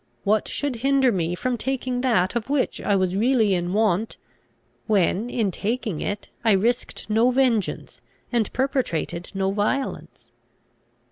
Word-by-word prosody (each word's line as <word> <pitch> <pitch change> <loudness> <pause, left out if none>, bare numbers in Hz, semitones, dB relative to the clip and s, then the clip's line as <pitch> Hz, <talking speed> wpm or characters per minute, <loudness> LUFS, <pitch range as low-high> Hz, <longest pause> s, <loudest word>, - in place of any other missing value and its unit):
What 215 +1 +2
should 285 -4 -2
hinder 270 +1 +3
me 175 -3 -1
from 245 +4 -2
taking 255 -1 -2
that 225 -6 +2
of 235 +2 -2
which 285 -2 0
I 205 - +1
was 185 -1 +1
really 225 -1 +3
in 175 -1 -1
want, 215 0 +1 0.7
when, 205 +2 +2
in 220 -5 0
taking 215 -3 -3
it, 205 0 -3 0.2
I 220 -2 +4
risked 235 +6 0
no 225 +3 +3
vengeance, 250 -5 0 0.3
and 235 -3 0
perpetrated 215 - -1
no 195 0 0
violence? 215 +7 -3
220 Hz, 140 wpm, -24 LUFS, 195-255 Hz, 0.7 s, I